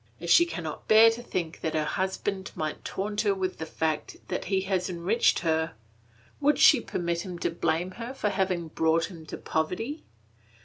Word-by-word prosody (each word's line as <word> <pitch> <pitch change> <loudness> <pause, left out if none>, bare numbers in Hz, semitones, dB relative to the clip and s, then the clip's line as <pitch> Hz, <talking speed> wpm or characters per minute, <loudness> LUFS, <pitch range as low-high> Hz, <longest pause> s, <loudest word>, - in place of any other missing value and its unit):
If 170 0 -2
she 345 - +7
cannot 165 - -6
bear 225 +1 +8
to 230 +1 -6
think 175 -8 -4
that 160 - -2
her 155 -1 +1
husband 190 +2 -2
might 155 -1 -4
taunt 205 +2 -2
her 205 -3 +2
with 185 -1 -3
the 160 - -4
fact 160 -1 -2
that - - -2
he 190 -1 +1
has 190 -1 -1
enriched 180 +7 +2
her, 160 -1 0 0.6
would 295 +1 +3
she 275 -6 +7
permit 170 -4 -2
him 180 -2 -6
to 170 - -1
blame 170 +2 -1
her 230 +5 -6
for 210 - 0
having 185 -4 -1
brought 160 +2 +1
him 160 -3 -11
to - - -6
poverty? 225 - -2
185 Hz, 185 wpm, -27 LUFS, 165-205 Hz, 0.6 s, bear